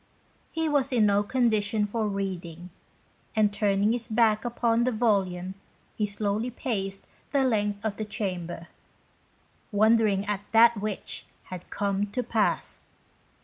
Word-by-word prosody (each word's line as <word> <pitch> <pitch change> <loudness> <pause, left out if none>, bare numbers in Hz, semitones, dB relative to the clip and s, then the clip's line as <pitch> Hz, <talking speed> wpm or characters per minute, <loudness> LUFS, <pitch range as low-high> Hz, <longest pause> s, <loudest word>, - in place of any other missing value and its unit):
He 325 0 -1
was 285 -3 +1
in 235 -4 +4
no 200 0 +4
condition 215 -3 +1
for 215 +1 -1
reading, 180 -3 -4 0.6
and 210 -2 +3
turning 205 0 +2
his 240 -1 -3
back 220 -1 +3
upon 235 -1 +1
the 255 - +2
volume 190 -5 0 0.4
he 210 - 0
slowly 205 +3 -1
paced 195 -6 -3 0.3
the 280 -2 +3
length 210 -4 0
of 210 -2 -2
the 215 - -3
chamber, 180 -5 -4 1.0
"wondering 215 -1 +3
at 205 -1 -2
that 235 +1 +7
which 210 -2 -3 0.2
had 180 -1 -7
come 200 0 -1
to 250 - -1
pass." 220 -3 0
210 Hz, 135 wpm, -27 LUFS, 200-230 Hz, 1.0 s, that